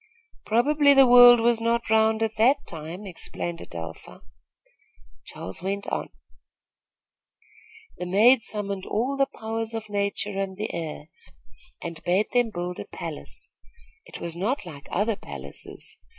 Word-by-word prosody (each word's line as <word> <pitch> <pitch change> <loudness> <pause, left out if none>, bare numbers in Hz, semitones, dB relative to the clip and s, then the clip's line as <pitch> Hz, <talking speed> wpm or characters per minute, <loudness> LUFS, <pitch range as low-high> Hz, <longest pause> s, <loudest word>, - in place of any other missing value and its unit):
"Probably 285 +5 +4
the 270 0 +8
world 245 -1 +9
was 235 0 +2
not 235 +1 0
round 220 0 +3
at 220 -1 -2
that 265 +6 +3
time," 165 +5 -8
explained 175 -2 -6
Adelpha. 80 -1 -9 1.0
Charles 95 - -8
went 200 +2 -3
on: - - -3 1.9
"The 180 - -4
maid 225 +7 +5
summoned 200 -3 -3
all 250 +6 -1
the 275 0 +2
powers 225 0 -4
of 220 -1 -6
nature 200 0 -2
and 190 -1 -4
the 215 +2 -4
air, 160 -2 -5 0.7
and 165 -1 -7
bade 185 +4 +1
them 245 -2 +2
build 175 -2 -5
a - - -5
palace. - - -9 0.6
It - - -9
was 170 -1 -5
not 210 +6 -2
like 145 -5 -10
other 210 +4 0
palaces. - - -9
210 Hz, 135 wpm, -25 LUFS, 180-235 Hz, 1.9 s, world